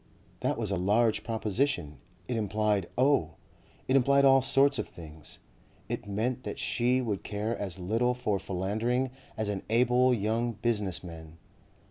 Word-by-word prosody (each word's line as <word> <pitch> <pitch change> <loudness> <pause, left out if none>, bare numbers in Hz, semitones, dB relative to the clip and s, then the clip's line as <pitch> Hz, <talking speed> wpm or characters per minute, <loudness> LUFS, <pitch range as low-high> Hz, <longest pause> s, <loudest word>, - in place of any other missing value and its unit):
That - - -1
was 110 -4 -2
a 95 - 0
large 105 +5 +2
proposition; 110 - -1 0.3
it 125 - -2
implied 105 -3 0
oh! 125 - +2 0.5
it 130 - +2
implied 140 +1 +4
all 135 0 +6
sorts 140 +2 +3
of - - -2
things. 80 -2 -12 0.5
It - - -4
meant 115 +5 -1
that - - -6
she 125 +2 +1
would 105 -5 -2
care 105 +2 -3
as 95 -5 -3
little 115 +7 0
for 105 -5 -1
philandering 110 +7 -1 0.3
as 110 -1 -1
an 100 -2 -2
able 125 +2 +4
young 115 +1 0
business 105 -6 -2
man. 80 -2 -10
110 Hz, 150 wpm, -29 LUFS, 95-125 Hz, 0.5 s, all